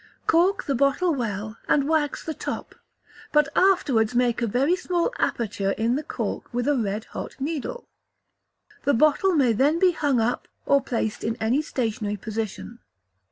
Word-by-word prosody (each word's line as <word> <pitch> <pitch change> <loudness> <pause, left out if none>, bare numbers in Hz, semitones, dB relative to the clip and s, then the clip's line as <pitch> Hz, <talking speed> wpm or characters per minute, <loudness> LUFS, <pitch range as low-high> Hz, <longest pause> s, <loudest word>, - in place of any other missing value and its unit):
Cork 360 +5 +3
the 280 - -1
bottle 280 +7 +2
well, 215 -4 -4
and 280 -1 +2
wax 310 -2 0
the 315 - -3
top, - - -5 0.6
but 300 -2 +3
afterwards 270 - +3
make 245 -1 +2
a 235 - +1
very 270 - +2
small 365 +2 -1
aperture 200 -4 -1
in 230 +2 0
the 290 - -1
cork 310 - -4
with 245 +1 -1
a 290 - +3
red 215 -2 -2
hot - - -6
needle. 320 - -4 1.0
The 285 - +3
bottle 310 +8 +3
may 255 -6 +4
then 280 +8 +3
be 365 +1 +4
hung 290 -6 +1
up, 235 +2 -1 0.2
or 280 0 +4
placed 225 -5 -3
in 225 0 -1
any 240 +5 +1
stationary 225 -7 -2
position. 220 +2 -5
265 Hz, 160 wpm, -24 LUFS, 225-310 Hz, 1.0 s, may